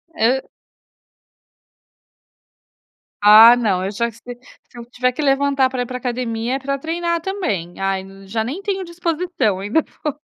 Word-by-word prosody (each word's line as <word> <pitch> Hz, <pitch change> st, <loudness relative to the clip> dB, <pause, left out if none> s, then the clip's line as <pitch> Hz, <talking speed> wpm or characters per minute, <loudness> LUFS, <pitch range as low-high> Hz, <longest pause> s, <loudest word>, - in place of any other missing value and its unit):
E 260 Hz, -1 st, +1 dB, 2.7 s
Ah, 220 Hz, +3 st, +9 dB
não, 200 Hz, -6 st, 0 dB
eu 195 Hz, -, -3 dB
já 235 Hz, +3 st, -2 dB
sei, 240 Hz, +2 st, -11 dB, 0.3 s
se 245 Hz, -, -17 dB
eu 235 Hz, -, -8 dB
tiver 250 Hz, +1 st, -1 dB
que 275 Hz, -, -5 dB
levantar 275 Hz, -1 st, +2 dB
pra 255 Hz, -1 st, -3 dB
ir -, -, -2 dB
para 250 Hz, -, -5 dB
a -, -, -9 dB
academia 240 Hz, -1 st, -2 dB
é -, -, -3 dB
pra 275 Hz, +1 st, -3 dB
treinar 340 Hz, +3 st, -2 dB
também. 220 Hz, -, -4 dB
Ai 195 Hz, 0 st, -1 dB
n 195 Hz, 0 st, -14 dB
já 220 Hz, +2 st, -2 dB
nem 290 Hz, -, -5 dB
tenho 390 Hz, -2 st, -2 dB
disposição 340 Hz, -, -2 dB
ainda 210 Hz, +11 st, 0 dB, 0.2 s
vou 300 Hz, -, -1 dB
250 Hz, 165 wpm, -19 LUFS, 220-305 Hz, 2.7 s, Ah